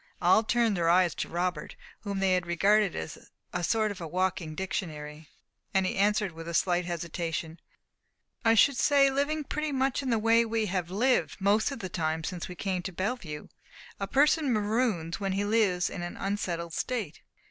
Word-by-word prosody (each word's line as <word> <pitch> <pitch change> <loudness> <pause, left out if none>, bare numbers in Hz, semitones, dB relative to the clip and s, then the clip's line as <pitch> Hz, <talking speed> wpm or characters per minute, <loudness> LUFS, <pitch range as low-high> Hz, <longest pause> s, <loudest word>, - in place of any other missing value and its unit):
All 180 +4 +5
turned 230 -1 +1
their 170 -2 +1
eyes 175 0 +4
to - - -4
Robert, 175 -2 -2 0.2
whom 200 -2 -4
they 185 -1 +3
regarded 195 +3 +2
as 80 - -7 0.2
a 180 - -2
sort 215 +3 +1
of 200 - -8
walking 175 -1 -2
dictionary; 155 -4 -5 0.5
and 190 -1 +3
he - - -1
answered 205 0 +2
with 165 0 -9
a 170 - -3
slight 175 0 +2
hesitation 170 -1 -4 0.8
"I 225 0 +5
should 265 +4 +5
say, 275 0 +4
living 290 +3 0
pretty 305 +2 -3
much 270 0 0
in 265 - -3
the 230 - +2
way 230 +1 +4
we 225 -1 -1
have 180 -3 -2
lived 245 +6 +1
most 205 +4 +3
of 275 - -5
the 185 - -3
time 160 -2 -2
since 175 0 -4
we 180 - -8
came 185 -1 -2
to 190 - -5
Bellevue. 185 -5 -4 0.5
A 195 - -2
person 290 +2 +3
maroons 210 -6 0
when 195 -1 -1
he 200 +1 0
lives 205 -5 +2
in 180 - -5
an 175 0 -6
unsettled 175 -4 -3
state." 225 -10 -3
190 Hz, 180 wpm, -28 LUFS, 170-225 Hz, 0.8 s, All